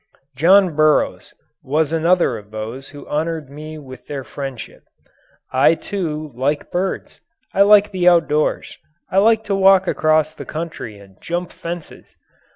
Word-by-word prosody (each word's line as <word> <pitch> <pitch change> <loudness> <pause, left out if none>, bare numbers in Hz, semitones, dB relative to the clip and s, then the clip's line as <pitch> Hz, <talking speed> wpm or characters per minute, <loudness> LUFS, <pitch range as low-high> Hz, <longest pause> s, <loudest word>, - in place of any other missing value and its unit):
John 180 +4 +4
Burroughs 155 0 +2 0.3
was 155 +3 0
another 165 -4 +2
of 105 -2 -10
those 110 +5 -7
who 145 -1 -12
honoured 155 -1 -3
me 155 +2 -8
with 130 -3 -12
their 140 -2 -5
friendship. 135 -1 -8 0.7
I, 135 +5 +4
too, 155 -6 -4
like 140 +5 -2
birds. 185 +2 -3 0.3
I 195 - +2
like 205 0 +6
the 180 -2 +4
outdoors. 155 -3 +1 0.3
I 190 - +3
like 220 +2 +3
to 200 - -2
walk 195 -1 +5
across 155 -1 +2
country 155 -12 -7
and 100 -2 -18
jump 175 +1 -4
fences. 170 -1 -9
155 Hz, 140 wpm, -19 LUFS, 140-180 Hz, 0.7 s, like